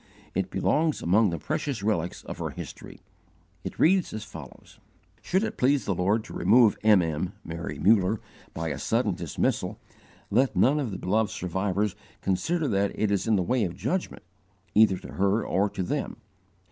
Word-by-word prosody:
It - - -1
belongs 155 0 +1
among 100 +5 +4
the 85 - -3
precious 110 - -3
relics 90 -5 -1
of - - -8
her - - -2
history. - - -9 0.6
It - - -6
reads 185 +2 +3
as 110 - -5
follows: 80 - -12 0.4
"Should 190 +3 +1
it - - -4
please 135 +2 +3
the 100 - 0
Lord 100 +5 +1
to - - -11
remove 110 +3 +5
M. 105 -4 +5
M. 80 +4 -2
[Mary 85 +1 -5
Muller] 105 0 +3 0.3
by 80 0 -3
a 70 - -4
sudden 115 -3 +1
dismissal, 85 -3 -2 0.5
let 125 +2 +2
none 130 +11 +4
of 135 -5 -2
the 95 - -5
beloved 105 +3 +1
survivors 100 +1 -1 0.2
consider 150 - 0
that 100 -1 +1
it 105 -2 +1
is 100 +2 0
in 110 - +4
the 95 - +1
way 125 +5 +1
of 90 -3 -3
judgment, 130 - -3 0.5
either 105 -3 +5
to - - -10
her 100 +3 +1
or 100 +3 +1
to 95 - -3
them. 145 +9 -3
105 Hz, 175 wpm, -27 LUFS, 90-115 Hz, 0.6 s, remove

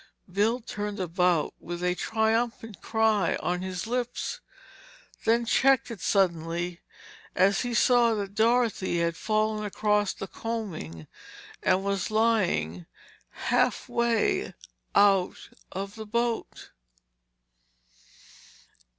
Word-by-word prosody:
Bill 220 +6 +1
turned 210 -2 -5
about 180 -2 +1
with 175 +1 -6
a 180 0 +2
triumphant 225 0 -1
cry 220 -5 +2
on 180 0 -2
his 185 -2 -4
lips, 245 - -3 0.9
then 235 +1 +3
checked 265 +1 +3
it 220 - -8
suddenly 170 -2 0 0.5
as 195 +2 +3
he 245 -1 -2
saw 235 -2 +4
that 200 -2 -4
Dorothy 225 -4 +2
had 170 0 0
fallen 215 +2 0
across 210 0 +1
the - - -6
coaming 195 - -5 0.6
and 190 - +2
was 200 -1 -1
lying 190 - +1 0.4
halfway 235 -2 0 0.4
out 195 -3 +4 0.3
of 195 +2 -5
the 220 -1 -8
boat. 235 +1 -2
210 Hz, 100 wpm, -27 LUFS, 180-225 Hz, 0.9 s, saw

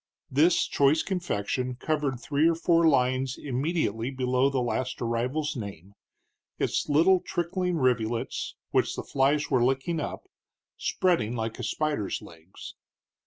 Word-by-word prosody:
This 155 +6 +4
choice 145 +3 +3
confection 130 - -2
covered 145 -2 -1
three 145 +6 +2
or 165 - +1
four 165 0 +3
lines 130 -2 +2
immediately 130 - -1
below 130 0 +1
the 135 -1 -1
last 120 +1 -2
arrival's 125 +7 -1
name, 100 -4 -8 0.6
its - - -1
little 170 +6 +5
trickling 180 0 -2
rivulets, 120 -4 -1 0.2
which - - +1
the - - -4
flies 145 +2 +1
were 130 -3 +3
licking 135 +6 0
up, 150 - -5 0.5
spreading 165 -11 0
like 115 0 -3
a - - -4
spider's 145 -4 -1
legs. 85 +2 -12
135 Hz, 130 wpm, -27 LUFS, 120-155 Hz, 0.6 s, little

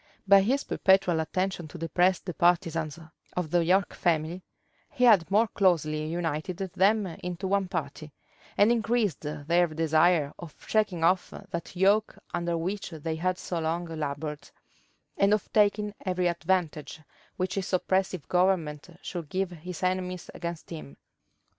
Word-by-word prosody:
By 200 0 +8
his 260 +8 +1
perpetual 190 -3 +3
attention 185 +1 -2
to 165 - -10
depress 175 +3 +2
the 180 - -7
partisans 165 -3 +1 0.4
of 170 -4 -2
the 175 -1 +3
York 185 +3 +2
family, 170 +1 0 0.5
he 275 -4 -2
had 205 -9 +6
more 215 +4 +4
closely 155 -5 +1
united 165 +1 -3
them 195 +3 +2
into 180 +1 -6
one 195 0 +1
party, 155 -3 -5 0.5
and 205 +3 +5
increased 230 -4 +1
their 160 +4 +1
desire 160 -1 +2
of 170 -3 -10
shaking 210 -6 +1
off 180 +2 +3 0.2
that 170 0 -5
yoke 200 +4 +2 0.2
under 170 -1 -1
which 190 +5 -3
they 160 -1 -4
had 185 +2 0
so 175 -2 -4
long 165 +2 -1
labored, 150 -2 -5 0.7
and 200 +1 +4
of 210 - -7
taking 210 0 +2
every 185 -1 -1
advantage 170 -3 -1 0.4
which 185 0 -1
his 195 -2 -3
oppressive 185 -2 0
government 180 -5 +1
should 170 -5 -6
give 190 +1 -1
his 175 +1 -8
enemies 185 -1 -2
against 170 -1 -6
him. 70 -2 -8
175 Hz, 145 wpm, -28 LUFS, 160-190 Hz, 0.7 s, By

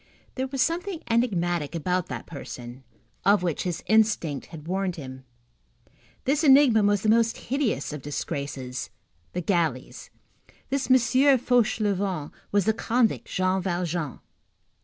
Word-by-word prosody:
There 260 0 -2
was 265 -2 +1
something 345 +1 -2
enigmatic 175 - 0
about 180 +2 -1
that - - -6
person, 130 -4 -9 0.4
of 200 -1 +4
which 170 -4 -1
his 175 -2 -3
instinct 210 -10 +2
had 160 -2 -11
warned 190 0 -1
him. 130 -3 -9 1.0
This 285 +4 +1
enigma 270 -6 +6
was 205 -1 +2
the - - 0
most 230 +1 +3
hideous 250 - -2
of 150 - -6
disgraces, 140 -3 -4 0.4
the 180 - -2
galleys. 165 -8 -1 0.6
This 275 -1 -1
M. 255 - +8 0.4
Fauchelevent 205 -9 0 0.2
was 205 -2 +2
the 220 - +3
convict 230 +1 0
Jean 185 0 0
Valjean. 175 -4 -2
185 Hz, 130 wpm, -26 LUFS, 160-230 Hz, 1.0 s, M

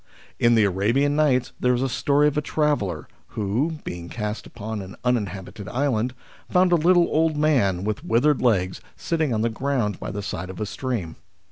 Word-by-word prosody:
In 120 0 +4
the 110 - +5
Arabian 115 +10 +2
Nights 140 -5 +2
there 125 0 +2
is 125 - -1
a - - +1
story 145 +3 +2
of 150 - 0
a 150 - +1
traveller 145 - -1 0.3
who, 110 +10 0
being 85 -1 -6
cast 105 -1 -4
upon 110 -1 -6
an 95 -1 -9
uninhabited 100 -4 -2
island, 125 -2 0 0.3
found 180 0 +3
a - - +6
little 175 +2 +5
old 160 -1 +1
man 120 - +2
with 105 0 -2
withered 135 +5 +2
legs 95 -7 +1 0.2
sitting 160 -4 -1
on 110 -2 0
the 115 - +1
ground 120 -5 -1
by - - -5
the 100 0 -5
side 95 -1 -5
of 95 - -8
a 105 - -1
stream. 105 -7 -4
120 Hz, 190 wpm, -24 LUFS, 100-145 Hz, 0.3 s, a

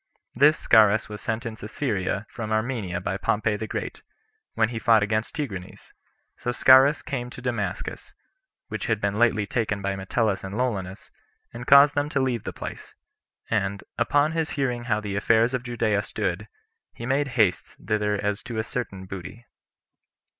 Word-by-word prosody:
This 150 +5 +5
Scaurus 105 -1 +4
was 105 -1 -7
sent 115 +1 -3
into 110 -2 -6
Syria 105 -5 -2
from 110 -2 -6
Armenia 110 -5 -1
by 95 +1 -2
Pompey 105 +1 0
the 110 +1 -5
Great, - - -5 0.5
when 110 -1 +2
he 115 -2 -4
fought 110 -2 +4
against 110 +2 -1
Tigranes; 100 - -6 0.4
so 125 - -2
Scaurus 130 +4 +6
came 125 -3 -4
to 125 - -10
Damascus, 115 -6 -4 0.6
which - - -4
had 110 -2 +1
been 100 0 -1
lately 115 -3 +3
taken 105 -1 -1
by 100 0 -2
Metellus 95 +1 -1
and 95 +2 -5
Lollius, 100 -7 -3 0.4
and 120 +1 -8
caused 140 +1 +8
them 145 +1 0
to 140 - 0
leave 125 -5 -1
the - - -3
place; - - -8 0.6
and, 100 -2 -1 0.2
upon 145 +6 +3
his 160 -1 -1
hearing 125 -4 -1
how 110 -3 0
the 100 -2 -4
affairs 115 +4 +3
of 125 - -1
Judea 115 -4 0
stood, - - -3 0.5
he 115 - -7
made 140 +3 +1
haste 100 -6 +1
thither 105 -1 0
as 105 0 -2
to 120 -2 -6
a 110 - 0
certain 100 -6 -5
booty. 95 +5 -9
110 Hz, 170 wpm, -25 LUFS, 100-125 Hz, 0.6 s, caused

